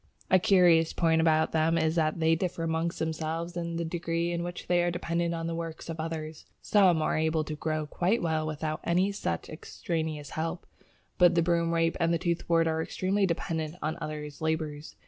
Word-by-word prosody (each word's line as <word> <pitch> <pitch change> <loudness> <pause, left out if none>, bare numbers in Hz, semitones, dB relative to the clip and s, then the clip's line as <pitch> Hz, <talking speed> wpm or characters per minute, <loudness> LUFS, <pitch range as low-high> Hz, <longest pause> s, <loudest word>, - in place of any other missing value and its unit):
A 185 - +7
curious 175 -5 +4
point 160 -1 +2
about 160 -1 +3
them 165 +1 +2
is 160 -1 +2
that 160 -1 0
they 160 0 +3
differ 170 0 -2
amongst 165 +1 -1
themselves 160 +1 -3
in 170 -1 -3
the 170 0 -2
degree 170 0 -2
in 170 0 -2
which 175 0 -6
they 175 -1 +2
are 175 - +1
dependent 170 -1 -1
on 165 0 -4
the 165 - -2
work 165 -1 -6
of 165 -1 -6
others. 160 -1 -5
Some 185 -6 +4
are - - 0
able 160 0 +1
to 155 0 -5
grow 155 0 -2
quite 180 +9 0
well 160 -2 -1
without 155 0 -3
any 185 +4 +2
such 85 - -3
extraneous 155 -2 -4
help, 165 +2 -3 0.5
but 175 -1 +6
the 170 - +3
Broomrape 165 -1 +1
and 170 0 +2
Toothwort 170 -1 +1
are 160 0 0
entirely 195 +4 0
dependent 160 -2 -2
on 155 +1 -1
others' 150 -1 -6
labours. 155 -1 -3
165 Hz, 185 wpm, -28 LUFS, 160-170 Hz, 0.5 s, A